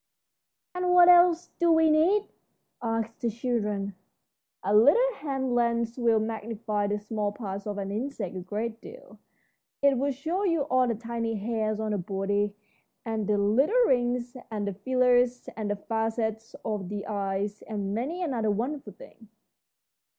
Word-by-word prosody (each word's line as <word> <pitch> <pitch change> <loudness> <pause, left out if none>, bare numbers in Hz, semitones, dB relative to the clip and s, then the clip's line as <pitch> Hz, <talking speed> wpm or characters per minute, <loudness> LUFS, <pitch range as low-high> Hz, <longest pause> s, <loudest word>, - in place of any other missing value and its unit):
"And 360 0 0
what 355 0 +8
else 350 -1 +5
do 340 -1 +4
we 320 -1 +5
need?" 350 +7 +4 0.6
asked 225 -1 -3
the 235 - +1
children. 210 -4 -2 0.7
"A 200 +3 +2
little 460 - +5
hand 270 -4 -2
lens 235 -1 +1
will 230 -2 +3
magnify 220 -1 -2
the 205 +1 0
small 210 0 -2
parts 200 -2 -6
of 205 -1 -3
an 195 -1 -3
insect 220 -4 -4
a - - -3
great 215 +5 -4
deal. - - -13 0.6
It 275 -3 +4
will 280 +2 +1
show 325 +9 -2
you 335 -6 +2
all 255 -3 +2
the 230 - 0
tiny 230 0 -3
hairs 215 0 -1
on 220 -1 -2
the 205 - 0
body, 200 +2 -1 0.5
and 220 -3 -2
the 210 - +2
little 245 - +3
rings 245 - 0
and 210 -2 -3
the 200 - -2
feelers 250 +3 +2
and 215 -2 -3
the 205 - 0
facets 225 +1 -2
of 205 -4 -3
the 205 0 -4
eyes, 200 0 -2
and 200 -3 -4
many 295 - -2
another 240 -9 0
wonderful 235 +1 -2
thing." 220 +3 -15
225 Hz, 160 wpm, -27 LUFS, 205-260 Hz, 0.7 s, what